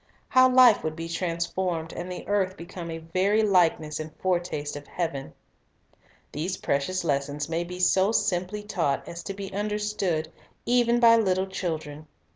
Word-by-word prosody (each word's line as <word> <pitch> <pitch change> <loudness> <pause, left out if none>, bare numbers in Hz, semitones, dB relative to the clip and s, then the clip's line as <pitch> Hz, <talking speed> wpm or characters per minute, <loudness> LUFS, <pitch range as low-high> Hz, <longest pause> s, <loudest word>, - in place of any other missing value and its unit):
How 255 0 +6
life 250 -4 +6
would 155 0 -2
be 165 0 -5
transformed, 170 0 -2
and 180 +1 -6
the 180 - -7
earth 195 -2 0
become 170 0 -8
a 165 - -4
very 185 +7 +1
likeness 170 -6 +2
and 155 0 -6
foretaste 175 -6 -2
of 145 0 -8
heaven! 160 -6 -3 1.0
These 180 +5 -3
precious 170 +7 -1
lessons 145 -1 -1
may 165 +1 -1
be 180 +1 -8
so 190 +3 +3
simply 205 -1 -1
taught 175 -9 -1
as 170 0 -7
to 195 - -5
be 195 -1 -7
understood, 205 -6 -1 0.3
even 240 -1 +3
by 230 -1 +7
little 190 -4 +1
children. 155 -5 -5
180 Hz, 155 wpm, -26 LUFS, 160-200 Hz, 1.0 s, by